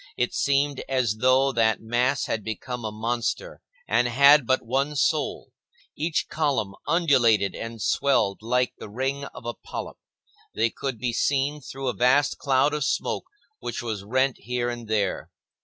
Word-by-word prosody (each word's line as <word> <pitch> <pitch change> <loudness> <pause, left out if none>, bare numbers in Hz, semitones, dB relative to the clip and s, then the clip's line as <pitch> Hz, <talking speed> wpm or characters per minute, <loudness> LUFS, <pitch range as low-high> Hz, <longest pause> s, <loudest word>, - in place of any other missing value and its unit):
It 125 - 0
seemed 140 -5 +1
as 125 -5 +1
though 130 +3 +4
that 115 -3 +2
mass 125 +4 0
had 110 -2 -2
become 120 +3 -5
a 110 - -3
monster 120 - -3 0.3
and 120 - +2
had 140 +2 +6
but 130 -2 +1
one 135 +5 0
soul. 145 +1 0 0.4
Each 160 +1 -1
column 135 -10 -1
undulated 120 - +3
and 115 0 -7
swelled 105 -4 +1
like 125 +2 0
the - - -8
ring 135 +5 -2
of 115 - -11
a 120 - -2
polyp. - - -7 0.6
They 115 +1 +2
could 135 -3 -4
be 120 +2 -2
seen 145 +4 0
through 135 0 -6
a 125 - +1
vast 130 +4 +2
cloud 140 +1 +2
of 150 -1 -1
smoke - - -1 0.3
which - - -5
was 110 -4 -4
rent 130 +5 +1
here 120 0 -2
and 120 -1 -7
there. 105 -3 -1
125 Hz, 160 wpm, -25 LUFS, 115-140 Hz, 0.6 s, had